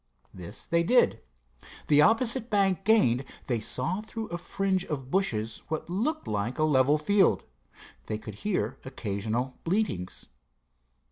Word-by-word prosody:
This 90 +3 -8
they 170 0 +2
did. 245 +9 +3 0.6
The 150 -1 +5
opposite 230 - +3
bank 195 -2 +1
gained, 140 - +4 0.2
they 120 -3 0
saw 160 - -2
through 220 0 -6
a 175 - -3
fringe 190 +1 -1
of 135 -3 -5
bushes 115 - -1
what 160 +2 -4
looked 300 - -1
like 105 +4 -2
a 155 - +1
level 145 -1 +4
field. 190 +5 +3 0.6
They 110 - -2
could 110 0 -8
hear 205 -3 -1
occasional 120 0 -3
bleatings. 165 - -2
155 Hz, 135 wpm, -28 LUFS, 120-200 Hz, 0.6 s, The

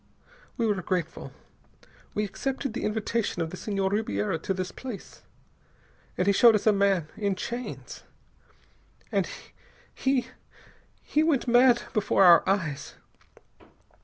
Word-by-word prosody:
We 235 - +1
were 205 -4 0
grateful. 175 -3 -3 0.8
We 210 - 0
accepted 265 +4 -3
the 250 - -3
invitation 215 -1 -1
of 165 -1 -2
the - - -6
Senhor 195 0 -2
Ribiera 160 - -1
to 180 - -4
this 185 0 -2
place. 250 -6 -9 1.0
And 180 - +1
he 200 - +4
showed 230 +2 +6
us 210 - -1
a 215 - +5
man, 195 -5 +1
in 200 -2 -1
chains. 240 +6 -6 1.9
He 265 -2 0 0.8
he 300 - +1
went 310 -5 +1
mad 245 0 +5
before 210 -3 +2
our 175 -2 +8
eyes. 155 -8 -2
205 Hz, 125 wpm, -27 LUFS, 185-240 Hz, 1.9 s, our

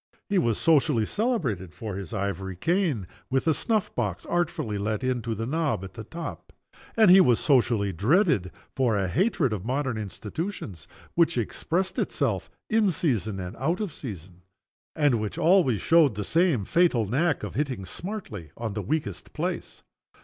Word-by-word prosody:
He 200 -2 +3
was 115 - +1
socially 145 -7 +3
celebrated 130 - -1
for 105 -4 -5
his 95 -4 -6
ivory 95 -2 -3
cane, 165 - 0 0.2
with 135 0 +1
a 160 - +4
snuff 215 +4 -1
box 105 -7 -2
artfully 160 -12 -1
let 105 +4 -2
into 120 -3 -1
the 115 +2 -3
knob 150 - -1
at 95 - -8
the 115 -2 -7
top 170 +8 -7 0.5
and 215 -5 +7
he 190 +1 +9
was 125 -8 +4
socially 115 -8 +2
dreaded 110 - +2 0.2
for 120 -5 +2
a 95 -2 0
hatred 160 - +1
of 100 -4 -4
modern 130 -1 -1
institutions, 105 - -6 0.3
which 170 -4 +3
expressed 180 - -1
itself - - -1 0.2
in 220 -2 +3
season 110 - 0
and 90 0 -6
out 160 +8 0
of 205 -8 -3
season, 90 - -8 0.5
and 145 -7 +2
which 105 - -4
always 165 - +4
showed 160 -8 +4
the 105 - -3
same, 160 - +2
fatal 165 - +3
knack 145 - +1
of - - -5
hitting 130 -9 -2
smartly 135 - -6
on 115 -3 -3
the 105 - -3
weakest 100 - -3
place. - - -4
125 Hz, 165 wpm, -26 LUFS, 105-170 Hz, 0.5 s, he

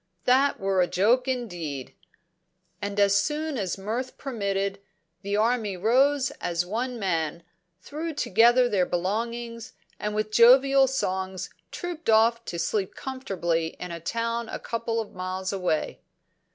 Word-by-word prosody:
That 270 +3 +3
were 195 -1 +1
a 175 - +3
joke, 230 +9 +2
indeed!" 175 - -4 0.9
And, 200 0 -3
as 200 -1 +5
soon 305 0 -2
as 200 -5 -2
mirth 230 +6 -4
permitted, 200 -6 -2 0.4
the 200 +1 -1
army 220 -3 +1
rose 260 +7 +3
as 175 0 -1
one 240 +6 -3
man, 170 -5 -1 0.4
threw 315 +3 -4
together 240 +3 +4
their 195 -6 +1
belongings, 230 +6 -3 0.3
and 210 0 -3
with 215 0 -1
jovial 265 +4 +6
songs 190 -7 -2 0.2
trooped 340 -5 -5
off 230 +1 +4
to 170 - -5
sleep 190 +3 -1
comfortably 175 -11 -2
in 180 - -6
a 170 - -5
town 230 +5 -2
a - - -4
couple 230 0 -3
of 220 - -5
miles 185 +1 -3
away. 180 -5 -1
215 Hz, 140 wpm, -26 LUFS, 185-250 Hz, 0.9 s, jovial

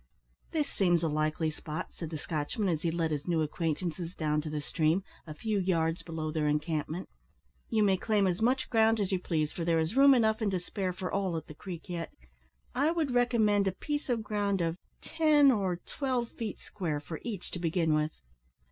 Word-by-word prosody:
"This 305 -3 0
seems 175 -4 +2
a - - +3
likely 155 +1 0
spot," 155 0 -6
said 165 - -6
the 160 - -4
Scotchman, 160 +8 -2
as 160 -3 0
he 170 - +1
led 165 -1 0
his 150 +1 -3
new 165 -3 +2
acquaintances 165 +2 -2
down 150 -1 0
to 155 - -5
the 150 0 -2
stream, 160 +5 +1 0.2
a 155 - -7
few 215 +4 -1
yards 165 -3 +1
below 160 -2 -4
their 155 -1 0
encampment. 155 +3 -1 0.6
"You 220 -2 +3
may 195 -2 +4
claim 210 +1 +2
as 185 +1 0
much 255 +3 +2
ground 225 -1 +4
as 200 -2 0
you 190 - +1
please, 155 -4 -1
for 170 - -3
there 165 0 +2
is 160 +6 0
room 275 0 +8
enough 220 -2 +2
and 215 - +2
to 190 -2 0
spare 185 +1 -3
for 185 0 -5
all 190 -4 0
at 160 - -5
the - - -10
Creek 170 +1 -8
yet. 170 -2 -4 0.6
I 280 +5 +2
would 325 -5 0
recommend 225 -5 +3
a - - +3
piece 290 +9 -4
of 235 -3 +1
ground 205 -2 0
of 165 -1 0 0.3
ten 300 -4 +5
or 195 -6 +1
twelve 255 -4 -2
feet 220 -4 -5
square 165 -7 -3
for 150 +2 -7
each 210 -7 -5
to 175 - -4
begin 165 -1 +1
with." 155 0 +1
180 Hz, 210 wpm, -30 LUFS, 160-220 Hz, 0.6 s, room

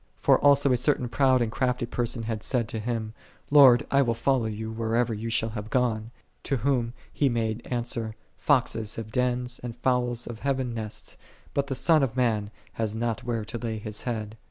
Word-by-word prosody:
For - - +4
also 140 -1 +5
a 125 - +4
certain 125 0 +1
proud 130 0 +3
and 110 - -3
crafty 125 0 0
person 120 0 -2
had 110 -1 -3
said 120 -2 0
to 110 - -3
Him, 110 -1 -3 0.4
"Lord, 135 -5 +7
I 140 - +5
will 115 -4 +1
follow 120 -1 +1
Thee 110 +1 -5
whithersoever 115 +1 0
Thou 115 +2 -4
shalt 115 0 0
have 105 -1 -6
gone;"8 115 -2 -3
to 135 - 0
whom 120 -1 0 0.2
He 140 - +2
made 115 -1 -1
answer, 115 -2 -2
" - - -40
Foxes 115 -6 +2
have 110 -1 -6
dens, 125 0 0
and 120 -2 -6
fowls 125 -1 0
of 115 -2 -7
heaven 130 -3 -1
nests: 110 -2 -4 0.4
but 140 0 0
the 135 - -2
Son 160 +3 +4
of 130 -2 -1
Man 110 -5 +1 0.2
hath 110 -1 -2
not 115 -1 -2
where 115 -3 -2
to 120 - -6
lay 110 -1 -3
His 105 0 -5
Head." 110 -3 -4
120 Hz, 200 wpm, -27 LUFS, 110-125 Hz, 0.4 s, Lord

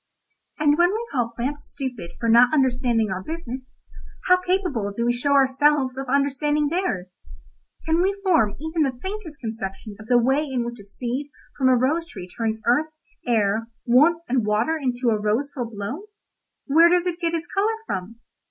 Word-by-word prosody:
"And 300 0 +3
when 350 +1 +5
we 450 +3 -3
call 245 -4 -1
plants 285 +5 -3
stupid 250 -11 -5
for 230 - -1
not 240 +2 +6
understanding 245 -6 +1
our 185 0 -3
business, 260 - -7 0.5
how 365 0 +4
capable 360 - -1
do 235 +4 -2
we 240 - +2
show 280 +4 0
ourselves 275 0 +3
of 270 0 -5
understanding 285 +2 +1
theirs? 205 - -2 0.7
Can 320 +1 +2
we 395 +2 0
form 270 - +3
even 320 +2 -2
the 265 -4 0
faintest 380 -4 -6
conception 215 -2 -6
of 215 - -11
the 245 - +4
way 265 +5 +2
in 260 -5 -2
which 235 0 -6
a - - -11
seed 245 +7 -4 0.3
from 260 -2 +2
a 255 - +5
rose 310 +7 +1
tree 180 -2 -8
turns 220 +3 -3
earth, 295 +7 +2 0.4
air, 220 -1 +1 0.2
warmth 305 +8 +4
and 245 -1 +1
water 215 +9 +1
into 250 -5 -1
a 215 -2 +1
rose 225 +7 0
full 245 -4 -4
blown? 230 - -6 0.6
Where 325 +4 +6
does 355 0 +2
it 355 -1 -2
get 335 -1 0
its 330 0 -3
colour 410 +5 0
from? 210 - -5
260 Hz, 180 wpm, -23 LUFS, 230-315 Hz, 0.7 s, not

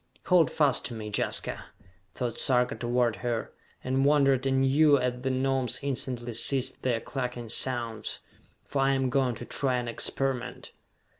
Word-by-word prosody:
"Hold 180 -3 +4
fast 145 -4 +2
to 120 - -3
me, 105 -1 -6
Jaska," - - -2 0.5
thought 125 -3 -3
Sarka 125 0 +2
toward 120 -3 0
her 115 +2 -3 0.3
and 130 +1 0
wondered 140 -2 +3
anew 135 +3 +4
as 125 -1 -2
the 135 - -1
Gnomes 130 -1 0
instantly 125 -3 -3
ceased 130 +3 +2
their 120 -3 0
clucking 125 -2 -5
sounds 115 -3 -1 0.5
"for 140 - -3
I 135 0 +3
am 135 -1 0
going 130 -3 +1
to 120 - -8
try 130 0 0
an 120 -1 -2
experiment." 130 +2 -1
130 Hz, 150 wpm, -28 LUFS, 120-135 Hz, 0.5 s, Hold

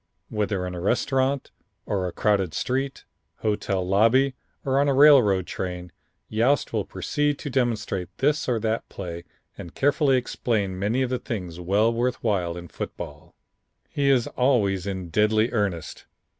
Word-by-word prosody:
Whether 105 -3 -1
in 90 - -5
a 90 - -5
restaurant 130 +6 0 0.3
or 95 -3 -1
a - - -4
crowded 95 -4 +1
street, 135 +2 -2 0.4
hotel 100 -3 -1
lobby 115 +8 +4 0.3
or 135 0 +2
on 145 - +3
a 135 - +2
railroad 130 -11 +6
train, 90 -1 -5 0.4
Yost 120 +6 +1
will - - 0
proceed 145 -1 -1
to 145 - -6
demonstrate 115 -8 -1
this 145 0 +1
or 120 -2 +1
that 110 +1 -2
play 85 -2 -7 0.3
and 85 - -9
carefully 140 -1 +3
explain 105 -6 -1
many 110 +7 +1
of 130 - -2
the 125 - 0
things 90 -7 -5
well 100 +6 +2
worth 120 +2 0
while 90 -6 0
in 85 0 -8
football. - - -8 0.5
He 140 -1 +1
is 130 -4 +4
always 100 -8 +1
in 95 -3 -4
deadly 110 +5 +2
earnest. 100 -7 -2
110 Hz, 155 wpm, -25 LUFS, 95-130 Hz, 0.5 s, railroad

